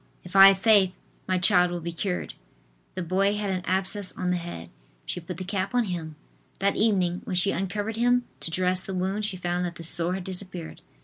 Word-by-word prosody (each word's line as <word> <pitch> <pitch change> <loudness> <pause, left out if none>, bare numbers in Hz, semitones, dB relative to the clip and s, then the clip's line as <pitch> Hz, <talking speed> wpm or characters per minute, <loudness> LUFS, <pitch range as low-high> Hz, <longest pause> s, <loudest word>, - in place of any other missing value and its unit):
If 180 +2 -11
I 195 0 +11
have 195 -1 +5
faith, 195 -3 +4 0.3
my 185 - +1
child 180 0 +4
will 175 0 -4
be 170 +1 -5
cured." 180 +2 -3 0.6
The 185 - -3
boy 195 +4 +1
had 205 -1 -2
an 185 -1 -2
abscess 190 +1 0
on 180 -1 -2
the 180 - +1
head. 170 - -8 0.3
She - - -3
put 175 0 -7
the 185 - -5
cap 195 +3 -3
on 245 - +3
him. 170 -6 -5 0.4
That 200 +1 +1
evening, 185 -5 +1
when 185 - -3
she 180 +2 +3
uncovered 205 +4 -3
him 245 +1 +3 0.2
to - - -2
dress 180 +2 0
the 190 - -5
wound, 190 +3 -1
she 195 -3 -1
found 175 0 -2
that 175 -1 -4
the 165 - -9
sore 170 +2 +1
had 190 - -5
disappeared. 185 -2 -4
185 Hz, 215 wpm, -26 LUFS, 175-195 Hz, 0.6 s, I